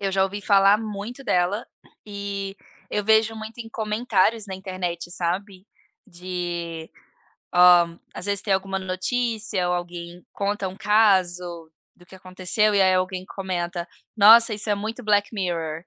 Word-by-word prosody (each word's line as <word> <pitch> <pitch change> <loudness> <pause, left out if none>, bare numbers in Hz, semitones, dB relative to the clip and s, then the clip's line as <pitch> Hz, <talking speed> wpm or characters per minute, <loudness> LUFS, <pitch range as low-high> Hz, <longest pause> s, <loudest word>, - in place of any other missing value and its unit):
eu 195 -1 -1
já 190 - +2
ouvi 200 +2 -4
falar 200 +1 +5
muito 220 +4 -6
dela 185 +5 0 0.4
,e 200 -1 -5 0.3
eu 210 - -1
vejo 220 +1 +3
muito 220 +1 -9
em 225 - -8
comentários 215 -1 0
na 190 - -6
internet, 185 -3 -5
sabe, 185 +3 -3 0.4
de 175 -2 -5 0.6
hã, 175 -1 +6 0.2
às 180 - -4
vezes 200 -1 0
tem 200 -3 +1
alguma 195 0 -2
notícia 205 0 -2
ou 180 - +1
alguém 175 0 -7
conta 200 -1 -2
um 185 - -10
caso 180 -6 +1 0.3
do 175 - -20
que 190 - -15
aconteceu 185 +3 0
e, 200 - +3
aí, 185 -1 +4
alguém 185 0 -1
comenta: 175 -2 -4 0.3
"Nossa, 220 +1 +7
isso 210 +1 -3
é - - +3
muito 220 +4 -5
Black 205 -1 +2
Mirror". 165 -4 -3
195 Hz, 150 wpm, -23 LUFS, 180-210 Hz, 0.6 s, Nossa